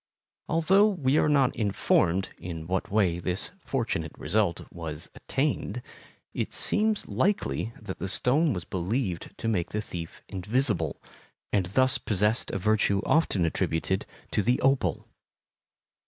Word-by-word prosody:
Although 190 +6 +5
we 150 -7 +2
are - - +3
not 140 -3 +3
informed 95 -3 +2
in 80 -3 -6
what 95 +2 -1
way 95 -5 +2
this 90 +2 -2
fortunate 115 - -2
result 95 +2 +1
was 80 -3 -6
attained, 130 -4 -2 0.5
it - - -2
seems 215 0 +1
likely 130 - 0
that 110 - -7
the 95 - -3
stone 145 - +2
was 90 -7 -3
believed 95 0 -2
to - - -3
make 90 -6 0
the 105 - -2
thief 85 -5 -7
invisible, 100 - -1 0.5
and 95 -3 +2
thus 130 +6 +2
possessed 105 +2 +1
a - - -2
virtue 105 0 +2
often 130 - +3
attributed 80 +3 0 0.2
to - - +2
the 120 +5 +2
opal. 135 0 +1
105 Hz, 135 wpm, -28 LUFS, 90-130 Hz, 0.5 s, Although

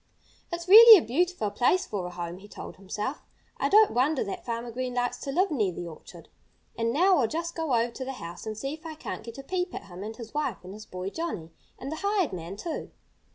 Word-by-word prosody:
"It's 340 +1 -4
really 445 +3 +12
a 330 - -1
beautiful 295 - 0
place 255 - +2
for 195 - -4
a - - -5
home," 175 0 -6
he 205 - -13
told - - -9
himself. 210 +8 -4 0.4
"I - - 0
don't 425 +1 +6
wonder 265 +4 +2
that 200 - -6
Farmer 235 0 -4
Green 250 +1 -4
likes 245 0 -1
to 275 - -4
live 370 +5 +2
near 215 -10 +1
the 175 0 -6
orchard. 160 - -12 0.5
And 230 0 0
now 360 +6 +4
I'll 240 - +3
just 335 +5 -3
go 320 -6 0
over 235 +1 +1
to 260 - -6
the 270 - -4
house 175 -3 -8
and 215 -1 -4
see 270 +6 -3
if 315 - -10
I 320 -1 -7
can't - - -6
get 230 +2 -10
a 275 - -8
peep 360 +4 -2
at - - -6
him 180 0 -11
and 220 +2 -6
his 230 -2 -9
wife 290 - -1
and 185 +1 -9
his 215 +1 -11
boy, 185 +1 -5
Johnnie 210 - -4 0.3
and 270 +3 -6
the 315 - -4
hired 395 - 0
man, 175 +2 -6
too." 320 +8 -5
245 Hz, 245 wpm, -27 LUFS, 205-325 Hz, 0.5 s, really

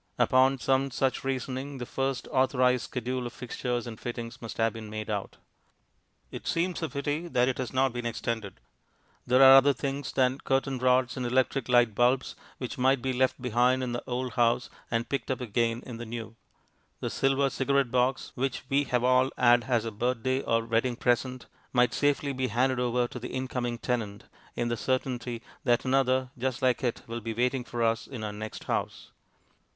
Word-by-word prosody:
Upon 130 +1 +4
some 135 +1 +1
such 135 0 -1
reasoning 135 +1 -3
the 125 - -5
first 135 0 -2
authorized 130 -2 +2
schedule 125 0 -3
of 120 - -9
fixtures 125 0 -3
and 115 -3 -8
fittings 120 +1 -6
must 115 - -7
have 115 0 +2
been 110 -2 -8
made 110 0 -5
out. 100 -2 -4 0.9
It - - -8
seems 175 +1 0
a 160 - -2
pity 145 +4 -2
that 125 -6 +2
it 130 - -1
has 130 -3 -3
not 130 -1 +2
been 120 -1 -3
extended. 110 -2 -3 0.7
There 130 +2 +6
are 135 0 +10
other 135 +1 +6
things 140 +1 -3
than 130 0 +2
curtain 135 -1 0
rods 130 +1 +2
and 130 - -2
electric 130 +1 +1
light 120 -3 +4
bulbs 125 +4 +2 0.2
which 125 0 -6
might 130 0 +3
be 130 -1 0
left 130 +1 +1
behind 125 +1 +2
in 125 - -2
the 120 - -3
old 125 -1 -3
house 120 +2 +2 0.2
and 115 0 -1
picked 135 -4 -3
up 130 - -1
again 115 0 -1
in 120 -3 -7
the 120 - -6
new. 115 -1 -6 0.6
The - - -3
silver 135 0 +2
cigarette 135 -1 +1
box, 125 +1 +1
which 130 -1 -2
we 140 +1 +2
have 125 -2 0
all 130 +1 +4
had 120 -1 +5
as 120 -3 +1
a 115 - -3
birthday 125 +4 -1
or 115 -2 0
wedding 115 +2 +1
present, 125 +1 0 0.3
might 125 -2 +3
safely 145 -1 +1
be 130 0 -1
handed 130 +1 +1
over 125 0 +1
to 125 - -8
the 125 - -6
incoming 125 -2 -3
tenant, 110 -5 -3 0.3
in 120 - -1
the 120 - -1
certainty 125 -2 -2 0.2
that 120 -2 +2
another 130 -1 +2
just 130 +1 -2
like 130 +1 +2
it 120 -2 -1
will 115 0 -5
be 115 0 -4
waiting 125 +2 0
for 120 -1 -3
us 115 0 +1
in 125 -5 -7
our 105 -1 -3
next 110 +1 -7
house. - - -3
125 Hz, 190 wpm, -28 LUFS, 120-130 Hz, 0.9 s, are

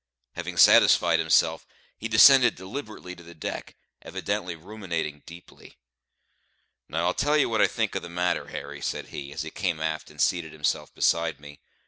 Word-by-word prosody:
Having - - -7
satisfied 85 -2 +6
himself, 80 0 +2 0.3
he 115 - -5
descended 125 +4 +6
deliberately 95 -1 -8
to 85 - -14
the 85 0 -14
deck, - - -6 0.3
evidently 85 -1 -4
ruminating 85 -5 -5
deeply. 85 +1 -14 1.1
"Now 85 +2 -1
I'll 90 - +1
tell 150 +1 +1
ye 150 - +3
what 110 -2 0
I - - +5
think 110 -3 -2
of - - -3
the 85 - -9
matter, 90 +1 -1
Harry," - - -8
said - - -4
he, 70 -1 -8
as 75 - -5
he 80 - -8
came 85 -5 -2
aft 80 0 -3
and - - -17
seated 85 -3 0
himself 75 -2 -2
beside 85 -2 +1
me. 75 0 -13
85 Hz, 170 wpm, -26 LUFS, 80-100 Hz, 1.1 s, satisfied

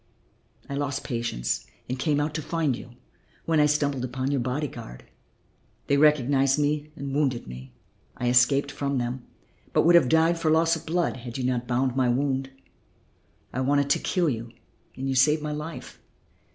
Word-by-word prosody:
I - - -6
lost 140 -1 -2
patience 115 - -2 0.2
and 130 +1 -4
came 145 0 +1
out 150 +1 -1
to 155 - -3
find 155 -4 -1
you, 120 0 -11 0.5
when 160 -2 +2
I 150 - +5
stumbled 145 -3 0
upon 130 +2 -2
your 140 - +1
body 130 +5 -1
guard. - - -10 0.8
They 140 - +2
recognized 140 -2 +4
me 150 0 0
and 140 -2 -5
wounded 135 -4 0
me. 65 0 -10 0.4
I 125 - -2
escaped 130 +4 +4
from 140 -1 -2
them, 120 +1 -3 0.5
but - - +4
would 170 - +6
have 170 -8 +6
died 165 +1 +3
from 155 -1 +2
loss 165 +1 +3
of 160 0 -9
blood 170 -2 0
had 120 0 -7
you 130 - -3
not 125 -1 -1
bound 125 +1 0
my 130 -2 +2
wound. 135 +1 0 1.0
I 130 - -1
wanted 140 +1 +2
to - - +3
kill 180 -3 0
you 115 -4 -2 0.5
and 135 +1 -4
you 135 - 0
saved 150 +4 +3
my 150 - -3
life. 150 +2 -7
140 Hz, 180 wpm, -26 LUFS, 125-150 Hz, 1.0 s, would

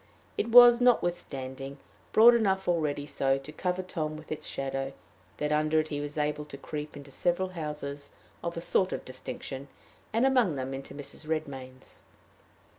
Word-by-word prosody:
It 230 - -1
was, 240 0 +9
notwithstanding, 140 - 0 0.3
broad 235 +2 +8
enough 195 -5 +1
already 150 -4 0
so 135 -2 +1
to 135 +2 -9
cover 180 +3 -2
Tom 155 -4 -3
with 155 - -12
its 155 - -4
shadow 135 0 -3 0.4
that 150 0 -1
under 155 +1 +3
it 155 0 -1
he 145 -1 -3
was 145 +1 -5
able 150 0 0
to 140 - -9
creep 150 +1 -6
into 140 -1 -11
several 175 +6 0
houses 150 -4 -6 0.3
of 170 0 -3
a - - -3
sort 185 +2 +1
of - - -5
distinction, 130 +1 -7 0.4
and 230 +4 +2
among 250 - +3
them 130 0 -3
into 135 +1 -7
Mrs. 145 +2 -9
Redmain's. 135 -5 -5
150 Hz, 165 wpm, -29 LUFS, 140-180 Hz, 0.4 s, was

